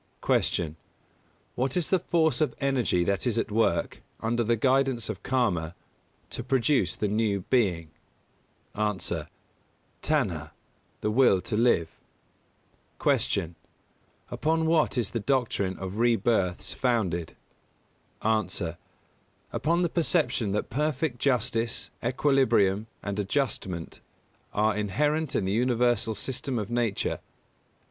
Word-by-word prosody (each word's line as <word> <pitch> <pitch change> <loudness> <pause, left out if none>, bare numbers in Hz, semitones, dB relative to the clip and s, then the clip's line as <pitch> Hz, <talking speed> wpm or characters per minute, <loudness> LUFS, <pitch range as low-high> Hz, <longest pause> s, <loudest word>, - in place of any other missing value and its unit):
238. - - +2
Q. 75 - -14 0.8
What 130 +5 -1
is 175 - -1
the 190 - +4
force 160 -3 +1
of 155 - +1
energy 130 -10 +1
that 100 +6 0
is 115 -2 +1
at 115 - -1
work, 110 +2 +1 0.2
under 120 +1 0
the 115 +1 +2
guidance 130 -1 +1
of 105 -4 -5
Karma, 90 -11 0 0.6
to 120 - -4
produce 130 - +2
the 105 - -1
new 105 -1 0
being? 90 -10 +2 0.8
A. 105 -1 0 1.1
Tanhā 100 - 0 0.5
the 105 - 0
will 120 -5 +5
to 110 - -3
live. 105 -8 +2 1.0
239. 80 - +1
Q. 85 - -19 0.8
Upon 160 +1 +1
what 160 -4 +2
is 115 -5 0
the 115 - -1
doctrine 110 -6 0
of 95 +3 -5
rebirths 110 -5 +1
founded? 100 - 0 0.9
A. 105 -6 0 0.8
Upon 170 +3 +1
the - - +3
perception 160 - +1
that 105 - -2
perfect 145 -1 -1
justice, 120 -3 0
equilibrium 120 -7 +2 0.2
and 100 0 -3
adjustment 95 - -2 0.5
are 110 +1 +2
inherent 145 +9 0
in 95 - +1
the 95 - 0
universal 120 -1 +2
system 130 +1 -3
of 105 0 -3
Nature. 120 -4 0
115 Hz, 120 wpm, -27 LUFS, 100-135 Hz, 1.1 s, will